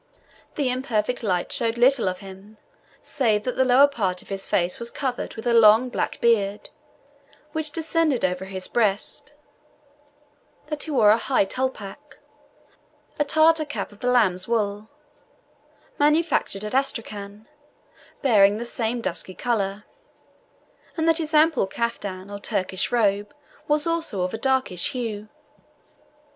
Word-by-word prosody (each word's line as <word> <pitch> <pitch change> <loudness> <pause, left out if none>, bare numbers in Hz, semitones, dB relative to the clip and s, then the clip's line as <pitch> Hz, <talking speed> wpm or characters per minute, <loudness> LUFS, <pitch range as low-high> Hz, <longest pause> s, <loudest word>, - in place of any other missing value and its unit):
The 275 -4 0
imperfect 250 -2 -1
light 180 -6 -1
showed 230 -3 0
little 245 -4 +4
of 185 +2 -6
him, 195 +2 -12 0.5
save 220 -7 0
that 250 - -3
the 260 - +3
lower 260 +2 +6
part 195 -10 -2
of - - -20
his 195 -1 -4
face 175 0 0
was 235 0 -4
covered 255 -1 -4
with 225 - -8
a 240 - +2
long, 225 +2 +6
black - - -3
beard, 210 -3 +1 0.8
which 315 -1 -2
descended 320 - 0
over 180 +1 -2
his 190 -1 -5
breast; 210 -4 0 1.3
that 300 -1 -4
he - - -3
wore 230 -8 +5
a 220 - +4
high 255 -4 +1
TOLPACH, 260 +3 -5 1.0
a - - +4
Tartar 315 +2 +3
cap 290 -6 -5
of 205 - -17
the 250 - -1
lamb's 190 -7 +2
wool 210 -2 -1 1.1
manufactured 300 -9 +1
at 210 - -5
Astracan, 215 -5 -3 0.8
bearing 205 -5 +5
the 235 - -5
same 235 0 -2
dusky 185 -4 -3
colour; 210 -4 -2 1.1
and 320 0 0
that 325 0 +4
his 315 -1 -2
ample 305 -8 +4
caftan, 200 -3 -4
or 200 - -6
Turkish 185 0 -2
robe, 205 -3 0 0.3
was 300 0 +1
also 330 - -1
of 180 - -3
a 225 - -4
dark 265 -1 +1
hue. 215 +3 -3
230 Hz, 140 wpm, -24 LUFS, 200-270 Hz, 1.3 s, lower